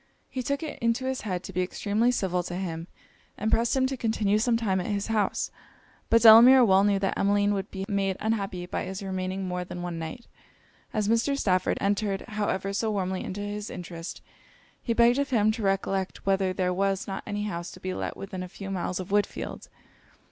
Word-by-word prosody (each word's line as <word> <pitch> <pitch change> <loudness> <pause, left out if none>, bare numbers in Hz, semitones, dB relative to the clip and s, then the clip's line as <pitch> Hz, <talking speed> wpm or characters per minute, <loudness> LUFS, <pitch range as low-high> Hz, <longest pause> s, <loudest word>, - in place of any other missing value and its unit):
He 260 - -3
took 280 +4 -2
it 310 - -6
into 230 +3 0
his 265 0 -2
head 185 -4 -3
to 190 - -8
be 185 - 0
extremely 210 +5 0
civil 190 -7 0
to 175 0 -6
him, 170 -3 -4 0.5
and 215 +2 -1
pressed 235 +3 +2
him 260 - +3
to 265 +1 -1
continue 220 -3 +1
some 230 +1 +2
time 200 -5 0
at - - -5
his 205 -1 -1
house; 210 -2 0 0.6
but 230 0 +4
Delamere 240 +3 +9
well 190 -2 +5
knew 200 -1 +3
that 195 0 -1
Emmeline 205 +1 +2
would 195 0 -3
be 190 -1 -5
made 195 -2 0
unhappy 200 -5 -2
by - - -3
his 190 +1 -6
remaining 190 0 -3
more 180 0 -2
than 175 0 -7
one 175 -2 -4
night; 165 +9 -6 0.7
as 210 -2 0
Mr. 230 +5 +2
Stafford 185 -7 +1
entered 200 -1 0
however 205 -2 -1
so 220 +2 0
warmly 190 -3 -1
into 200 +2 -5
his 205 +1 -4
interest, 170 -1 -7 0.6
he 235 - -1
begged 235 +3 +4
of 280 - 0
him 215 -4 +3
to 225 +1 -5
recollect 195 -1 -1
whether 195 -1 +2
there 180 0 0
was 195 +1 0
not 195 -1 -4
any 205 -1 -2
house 175 -4 -4
to - - -12
be 185 0 -4
let - - -4
within 195 -1 -6
a 180 - -6
few 195 +1 -7
miles 185 -1 -2
of 185 - -6
Woodfield. 205 0 -1
200 Hz, 205 wpm, -27 LUFS, 185-220 Hz, 0.7 s, Delamere